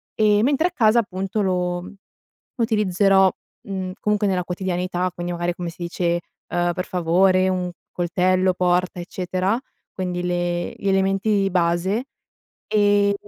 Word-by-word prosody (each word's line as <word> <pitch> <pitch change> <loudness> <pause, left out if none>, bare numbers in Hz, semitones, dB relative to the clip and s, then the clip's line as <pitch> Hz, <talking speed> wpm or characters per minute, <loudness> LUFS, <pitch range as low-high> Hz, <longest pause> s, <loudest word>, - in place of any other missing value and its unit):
ehm, 210 -1 +3
mentre 290 +6 +3
a - - -6
casa 230 -7 +4
appunto 195 -1 -2
lo 180 -2 -1 0.6
utilizzerò, 195 -4 +3 0.4
mhmm, 190 -2 -4
comunque 210 0 +1
nella 185 -2 0
quotidianità, 180 0 -2
quindi 175 0 -4
magari 175 0 -1
come 175 -1 -4
si 175 +1 -8
dice 170 0 -1 0.3
uhm, 175 0 0
per 180 +1 -3
favore 185 +2 +3
un 180 -1 -1 0.2
coltello, 185 +1 +1
porta, 180 0 +1
eccetera, 185 +4 -1 0.3
quindi 180 -1 -3
le 175 -1 -1
gli 200 - -4
elementi 195 +1 +2
base, 180 +5 +1 0.6
ehm, 205 -1 +3
185 Hz, 130 wpm, -22 LUFS, 175-200 Hz, 0.6 s, casa